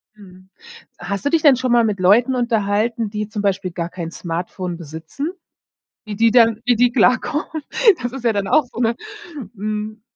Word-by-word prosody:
Mhm. 185 -2 -16 0.5
Hast 200 +5 -5
du - - +3
dich 325 +1 +2
denn 290 -4 +6
schon 255 0 -2
mal 240 -1 +5
mit 210 -3 -1
Leuten 230 +8 +4
unterhalten, 225 -1 0
die 210 0 -4
zum 215 -1 -5
Beispiel 195 -2 -1
gar 170 -1 -4
kein 170 -2 -6
Smartphone 175 +1 -5
besitzen? 160 - -6 0.7
Wie 215 -2 -6
die 230 +2 +4
dann 230 -2 +4
wie 245 0 +3
die 245 +1 +3
klar 250 +1 +4
kommen? 305 0 -4 0.4
Das 245 0 -3
ist 265 -2 -8
ja 230 - +3
dann 200 -2 -2
auch 310 - +4
so 240 - -12
'ne, 235 -1 +2 0.6
hm 215 +1 -5
215 Hz, 190 wpm, -20 LUFS, 195-245 Hz, 0.7 s, denn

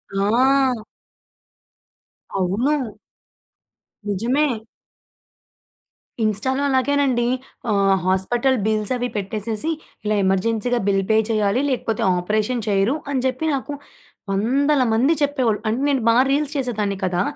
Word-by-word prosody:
ఆ! 250 +4 +2 1.5
అవును. 220 +5 0 1.1
నిజమే. 240 +9 +1 1.8
ఇన్‌స్టాలో 220 +6 0
అలాగేనండి. 265 -2 +2 0.5
ఆహ్, 195 -1 +3
హాస్పటల్ 235 +8 +1
బిల్సవి 220 +3 0
పెట్టేసేసి, 215 +8 -3 0.3
ఇలా 210 0 +1
ఎమర్జెన్సీగా 225 +5 +1
బిల్ 195 -1 +2
పే 220 - +4
చేయాలి. 215 +2 +1
లేకపోతే, 230 -4 -2 0.2
ఆపరేషన్ 215 +6 -1
చేయరు 200 +6 +2 0.2
అని 265 -2 0
చెప్పి, 260 +4 -1
నాకు 275 +2 -4 0.6
వందల 265 +8 +2
మంది 255 +8 +3
చెప్పేవాళ్ళు. 260 -7 +1
అంటే, 225 +4 0
నేను 270 -3 +1
బా 230 - +4
రీల్స్ 290 +1 0
చేసేదాన్ని 215 -7 -1
కదా! 180 -1 0
230 Hz, 100 wpm, -21 LUFS, 205-265 Hz, 1.8 s, పే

